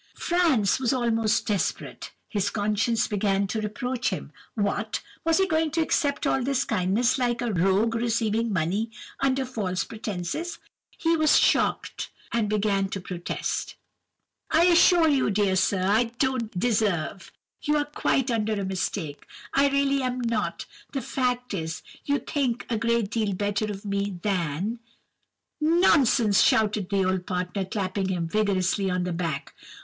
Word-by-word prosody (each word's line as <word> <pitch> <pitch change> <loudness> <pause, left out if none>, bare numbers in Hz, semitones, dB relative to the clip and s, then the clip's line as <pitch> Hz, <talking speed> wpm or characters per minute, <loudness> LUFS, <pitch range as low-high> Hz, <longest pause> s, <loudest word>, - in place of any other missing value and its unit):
"Franz 315 - +2
was 255 -1 +1
almost 225 -3 +1
desperate. 205 -4 -2 0.2
His 205 -2 -1
conscience 215 +2 0
began 200 -1 +1
to 215 +3 -2
reproach 245 +4 -2
him. - - -5 0.2
What! 210 0 -1 0.2
was 330 0 +3
he 385 - +4
going 320 -3 +1
to - - +4
accept 285 -3 0
all 265 - +2
this 275 +1 0
kindness, 220 +5 +1
like 240 -2 0
a 240 -3 -1
rogue 195 +5 +2
receiving 230 -1 0
money 195 +5 0 0.3
under 270 0 +1
false 200 -7 -2
pretences? 215 - -4 0.4
He 330 0 +2
was 310 -1 +4
shocked, - - +1 0.2
and 225 -3 0
began 200 -2 +1
to 195 - -4
protest:— 180 -1 -4 0.7
"'I 325 +1 +4
assure 345 -1 +6
you, 280 -6 +2
dear 200 -2 +2
sir, 185 0 +1
I 215 +5 +3
don't 235 -4 -2
deserve—You 210 - -1
are 290 - +1
quite 270 -3 0
under 220 -1 0
a 200 -2 -2
mistake—I 190 - -2
really 280 0 +2
am 255 0 -2
not—the 230 +4 -3
fact 250 -1 -1
is, 165 -3 -4 0.2
you 285 0 +2
think 255 -6 -2
a 230 - +1
great 230 -2 +1
deal 215 -3 0
better 205 +2 -1
of 205 -1 -6
me 200 -1 -2
than—" 190 +3 -1 0.8
"'Nonsense!' 300 - +4
shouted 210 -3 +2
the 195 -2 +1
old 185 -1 -1
partner, 180 +1 -2
clapping 190 0 -2
him 175 -3 -1
vigorously 195 0 +1
on 180 0 0
the 180 -1 -2
back. 165 -5 -3
215 Hz, 145 wpm, -26 LUFS, 195-255 Hz, 0.8 s, assure